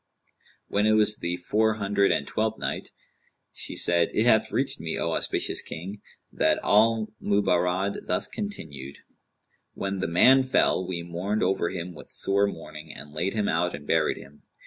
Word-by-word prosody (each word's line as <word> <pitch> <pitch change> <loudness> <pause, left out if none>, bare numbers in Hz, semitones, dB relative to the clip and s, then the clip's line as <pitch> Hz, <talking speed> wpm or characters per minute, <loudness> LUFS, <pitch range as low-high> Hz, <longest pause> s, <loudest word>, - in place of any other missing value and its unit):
When 105 +1 +1
it 110 - +4
was 105 0 +4
the 85 +1 -2
Four 110 +4 +1
Hundred 100 -1 +1
and - - 0
Twelfth - - -1
Night, - - -4 0.6
She - - -3
said, 85 -1 +2
It 110 - +3
hath 110 -2 +4
reached 135 +2 -1
me, 80 0 -3
O 85 - -1
auspicious - - 0
King, 95 +5 -8 0.3
that - - +2
al 110 0 +3
Mubarrad 95 -1 0
thus - - +1
continued: 70 - -7 0.8
"When 95 0 -3
the - - -1
man 125 +11 +6
fell 130 -7 +1
we 85 -2 -3
mourned 90 +5 -2
over 95 -2 +1
him 90 -1 -5
with - - -13
sore 100 +1 +2
mourning 75 -5 -8
and 75 +1 -10
laid 90 +7 -2
him 105 -2 0
out 90 +2 0
and 75 - -11
buried - - +1
him. 70 +2 -14
95 Hz, 170 wpm, -26 LUFS, 85-105 Hz, 0.8 s, man